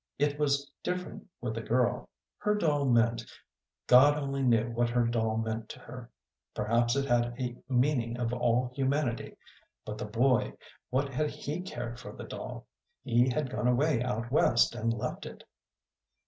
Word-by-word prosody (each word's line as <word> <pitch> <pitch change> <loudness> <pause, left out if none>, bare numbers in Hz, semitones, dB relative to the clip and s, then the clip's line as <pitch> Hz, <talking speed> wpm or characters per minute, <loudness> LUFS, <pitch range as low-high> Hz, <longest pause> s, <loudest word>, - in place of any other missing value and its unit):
It 145 +1 0
was 140 -1 +1
different 180 0 -4
with 110 -2 -3
a - - -5
girl. 120 +2 0 0.3
Her 210 0 +1
doll 150 -8 +1
meant 120 -2 +3 0.6
God 140 +4 +7
only 140 -1 -2
knew 120 -2 +3
what 120 0 +1
her 120 0 +2
doll 110 -1 0
meant 110 0 -3
to - - -9
her; 125 -1 -10 0.5
perhaps 115 +3 +2
it 140 0 +1
had 120 -2 +1
a 125 -1 -2
meaning 125 -2 +1
of 120 -1 -1
all 125 0 +1
humanity. 135 -2 -1 0.5
But 105 0 -6
the - - -3
boy, 120 +4 +2 0.4
what 135 +2 0
had 150 +3 -1
he 150 +3 -5
cared 120 -10 -6
for - - -9
the - - -8
doll? - - -7 0.4
He 120 +2 +3
had 135 0 -1
gone 125 -1 -1
away 125 +1 +2
out 120 -1 -2
West 120 -5 +4
and 115 -1 -1
left 115 -1 -4
it. - - -11
125 Hz, 165 wpm, -30 LUFS, 115-140 Hz, 0.6 s, God